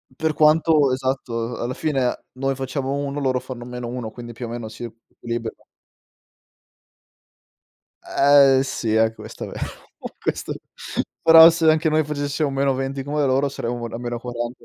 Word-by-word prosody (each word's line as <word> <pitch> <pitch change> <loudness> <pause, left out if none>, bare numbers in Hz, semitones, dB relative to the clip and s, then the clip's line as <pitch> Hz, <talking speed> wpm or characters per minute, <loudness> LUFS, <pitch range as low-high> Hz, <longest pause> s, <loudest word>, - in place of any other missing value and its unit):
Per 160 +2 -1
quanto 155 -2 +4
esatto, 125 -3 -2
a - - -7
alla 125 +2 -3
fine 135 -6 -1
noi 135 +1 -2
facciamo 135 +1 -3
1, 140 0 -3
loro 130 -2 0
fanno 125 -2 -8
-1, 125 -1 -5
quindi 120 +1 -10
più 120 +1 -6
o - - -8
meno 120 -1 -5
si 110 +2 -9
equilibrano. 115 0 -7 2.4
Eh, 140 -1 +5
sì, 115 -4 -2
è 110 0 +3
questo - - -9
vero, - - -8 0.6
questo - - -2 0.7
però 165 0 +9
se 165 -1 +2
anche 160 +1 +3
noi 155 0 +2
facessimo 145 0 -2
-20 135 0 -1
come 145 +1 -1
loro, 135 +1 +2
saremmo 120 -2 -4
n - - -11
a - - -3
-40, 120 0 -5
130 Hz, 150 wpm, -22 LUFS, 120-145 Hz, 2.4 s, però